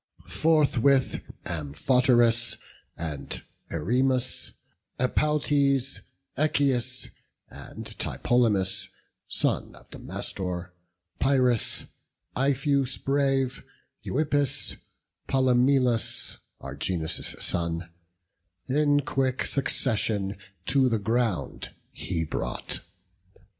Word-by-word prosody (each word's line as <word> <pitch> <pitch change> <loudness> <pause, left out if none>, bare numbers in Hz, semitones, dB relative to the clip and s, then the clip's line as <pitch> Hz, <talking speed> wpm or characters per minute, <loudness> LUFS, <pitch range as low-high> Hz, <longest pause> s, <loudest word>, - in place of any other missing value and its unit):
Forthwith 140 -4 +3 0.2
Amphoterus, 115 - +2 0.4
and 75 -5 -5 0.3
Erymas, 125 - +1 0.5
Epaltes, 140 0 +1 0.3
Echius, 135 -4 +1 0.4
and - - -9
Tlepolemus, 100 -6 +1 0.4
Son - - 0
of - - -18
Damastor, 90 -2 -4 0.5
Pyris, 130 -4 +2 0.5
Ipheus 135 0 +1
brave, 135 -2 0 0.4
Euippus, 145 -1 0 0.5
Polymelus, 130 -2 +2 0.2
Argeas' 80 +4 -1
son, 85 0 0 0.8
In 145 +1 +3
quick 135 -2 0
succession 105 -7 +1 0.3
to 135 -2 +3
the 115 - +1
ground 110 -1 -1 0.2
he 85 -3 -2
brought. 80 - -3
125 Hz, 65 wpm, -27 LUFS, 100-135 Hz, 0.8 s, Forthwith